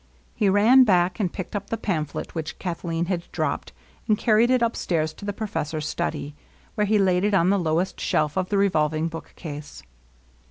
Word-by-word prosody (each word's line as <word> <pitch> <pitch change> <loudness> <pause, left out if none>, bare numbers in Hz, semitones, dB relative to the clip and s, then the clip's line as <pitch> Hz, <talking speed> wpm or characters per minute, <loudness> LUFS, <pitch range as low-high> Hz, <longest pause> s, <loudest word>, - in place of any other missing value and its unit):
He 205 - +2
ran 225 +7 +6
back 185 -3 +2
and 185 -5 0
picked 185 +1 -6
up 200 0 -4
the 225 - -1
pamphlet 160 -9 -3
which 160 -2 -5
Kathleen 170 -2 -3
had 175 -1 -3
dropped, - - -2 0.4
and 215 -2 +3
carried 225 +2 +3
it 255 -2 +3
upstairs 165 -9 0
to 200 - -11
the 205 - -1
profes 205 -7 -3
sor's 155 0 -4
study, 145 -1 -3 0.4
where 210 -2 0
he 215 +1 +3
laid 185 -2 +2
it 205 -1 +2
on 185 0 +4
the 200 - +2
lowest 170 +2 -1
shelf 150 -1 0
of 185 -1 -1
the 205 - +1
revolving 160 -4 +1
bookcase. 150 - -9
185 Hz, 190 wpm, -24 LUFS, 160-205 Hz, 0.4 s, ran